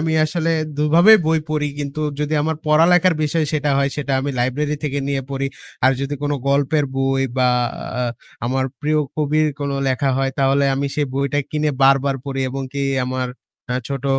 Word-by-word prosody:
আমি 160 0 0
আসলে 165 +1 -1 0.3
দুভাবেই 170 +9 +6
বই 160 0 +3
পড়ি। 150 -1 0
কিন্তু 145 +1 -4 0.2
যদি 150 +1 -1
আমার 160 0 -1
পড়ালেখার 165 +3 +5
বিষয় 155 +1 +1
সেটা 150 -1 0
হয় 140 0 +1
সেটা 145 -2 -2
আমি 140 +1 -2
লাইব্রেরি 145 +5 0
থেকে 145 -1 -1
নিয়ে 140 -1 -1
পড়ি। 135 0 -1 0.4
আর 130 - +6
যদি 140 +1 -2
কোন 145 0 0 0.2
গল্পের 140 +2 +2
বই 135 0 +1
বা, 130 -1 +3 0.5
আ - - 0 0.4
আমার 130 +2 0 0.2
প্রিয় 155 +1 +1 0.2
কবির 155 +1 +2
কোন 140 0 -2 0.2
লেখা 135 +1 +1
হয়। 135 0 0
তাহলে 135 +1 +3
আমি 140 +1 -1
সেই 145 -1 0
বইটা 140 +1 0
কিনে 150 0 0
বারবার 135 0 +4
পড়ি, 135 -1 -3
এবং 135 +1 -4
কি 140 0 -2 0.2
আমার 130 0 -2 0.5
আ - - -1
ছোট 140 -1 -4
145 Hz, 180 wpm, -20 LUFS, 135-155 Hz, 0.5 s, দুভাবেই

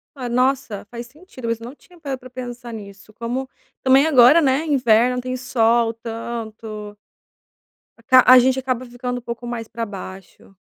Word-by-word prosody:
Ah, 255 -3 -5
nossa, 250 -3 0
faz 235 0 -7
sentido, 265 -3 -11
mas 230 0 -1
eu - - -8
não 250 +4 -9
tinha 350 +3 -21
parado 275 -4 -5
pra 255 - -13
pensar 245 -1 -8
nisso, 200 -1 -11
como 240 +4 -4 0.4
também 265 +2 +5
agora, 275 +2 +6
né, 275 +1 +1
inverno, 250 -3 +2
tem 255 0 -4
sol 235 -2 +1
tanto. 225 -2 -7 1.0
Aca 255 +3 +5
a 255 0 +10
gente 260 +1 +2
acaba 255 -1 -3
ficando 245 0 -5
um - - -16
pouco 235 0 -7
mais 235 -2 -5
para 230 +1 -5
baixo. 195 -1 -11
245 Hz, 170 wpm, -21 LUFS, 230-255 Hz, 1.0 s, a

